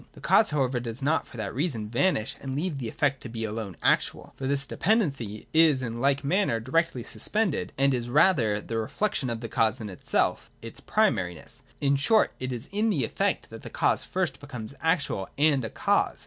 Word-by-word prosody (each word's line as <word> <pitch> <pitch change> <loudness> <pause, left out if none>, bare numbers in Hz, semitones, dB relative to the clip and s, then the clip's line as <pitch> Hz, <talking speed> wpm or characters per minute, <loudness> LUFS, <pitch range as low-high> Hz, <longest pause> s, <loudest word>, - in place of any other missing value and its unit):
The - - -14
cause 220 - +4
however 135 -4 0
does 120 +2 -6
not 155 +3 +1
for 120 - -12
that 105 -3 -4
reason 125 -6 -2
vanish 120 - 0
and 135 -1 -4
leave 155 -1 -2
the 120 - -4
effect 140 0 0
to 120 - -7
be 115 -1 -5
alone 110 -3 -4
actual. - - +1
For 135 - -4
this 140 0 0
dependency 140 - 0
is 155 -5 +5
in 115 -1 -4
like 140 +1 +2
manner 155 - +1
directly 130 +2 0
suspended, 175 - -1
and 135 0 +3
is 120 -1 -2
rather 130 - +4
the 115 +1 -3
reflection 145 - -1
of 115 -1 -3
the 115 - -4
cause 110 +2 +1
in 105 -3 -6
itself, 90 - -1
its 115 0 -9
primariness: 95 - -1 0.2
in 140 0 +2
short, 215 +11 +3
it 130 0 -3
is 120 +1 -5
in 210 +3 +1
the 145 - +1
effect - - -1
that - - -9
the - - -8
cause - - +1
first 175 -8 -2
becomes 125 -5 -8
actual 160 - 0
and 145 -3 +3
a 110 - -3
cause. - - +1
135 Hz, 200 wpm, -27 LUFS, 115-155 Hz, 0.2 s, is